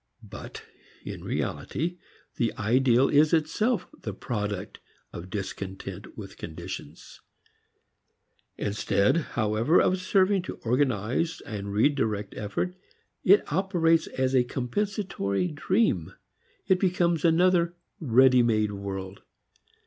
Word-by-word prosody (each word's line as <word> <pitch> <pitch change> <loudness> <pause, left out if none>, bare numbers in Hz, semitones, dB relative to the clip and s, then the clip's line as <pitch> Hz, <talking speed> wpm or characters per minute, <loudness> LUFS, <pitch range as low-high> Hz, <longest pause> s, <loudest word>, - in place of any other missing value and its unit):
But - - -9 0.4
in - - -7
reality 175 +4 -3 0.4
the 115 -2 0
ideal 125 +4 +3
is 150 +2 +4
itself 175 +7 +1 0.2
the 105 -3 -5
product 105 -4 -4 0.3
of 90 +2 -8
discontent 95 -1 -6
with - - -9
conditions. 85 -1 -8 1.4
Instead 105 +4 +1 0.2
however 110 +8 +3
of 185 0 +2
serving 190 +1 +3
to 180 - -7
organize 125 - 0
and 105 +7 0
direct 105 -6 -2
effort, 105 - -3 0.5
it 195 -5 +4
operates 165 -3 +2
as 130 0 -1
a 130 -2 +5
compensatory 165 - -2
dream. 155 - 0 0.5
It 190 -1 +3
becomes 175 -4 +1
another 170 +1 +3 0.2
ready 130 -2 +5
made 110 -3 +2
world. 100 -1 -6
130 Hz, 105 wpm, -27 LUFS, 105-175 Hz, 1.4 s, a